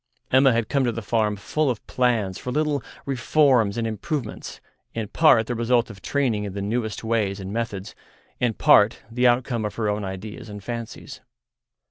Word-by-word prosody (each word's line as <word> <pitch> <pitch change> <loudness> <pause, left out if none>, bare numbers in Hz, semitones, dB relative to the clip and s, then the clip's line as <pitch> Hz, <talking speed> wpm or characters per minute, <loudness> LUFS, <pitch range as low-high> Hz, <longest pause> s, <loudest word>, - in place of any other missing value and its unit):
Emma 135 +1 +6
had 115 -2 0
come 140 +1 +1
to 120 - +1
the 115 0 -5
farm 105 -1 +1
full 150 +8 -1
of 120 -4 -3
plans 115 -7 0
for 125 - -5
little 150 -1 0 0.2
reforms 130 -5 +2
and 115 - -1
improvements, 120 +2 -4 0.4
in 110 -2 -2
part 120 -4 +4
the 120 - -3
result 120 0 +1
of 95 -3 -13
training 125 -7 0
in 100 -2 -5
the 100 - -4
newest 110 +2 -2
ways 110 -3 0
and 95 +1 -6
methods, 105 -4 -4 0.5
in 120 -3 +1
part 105 +1 +4
the 125 +2 +3
outcome 120 -1 +1
of 105 - -4
her 110 -2 -1
own 105 0 -1
ideas 105 +4 -7
and 105 -1 -8
fancies. 115 +1 -7
115 Hz, 180 wpm, -24 LUFS, 105-125 Hz, 0.5 s, Emma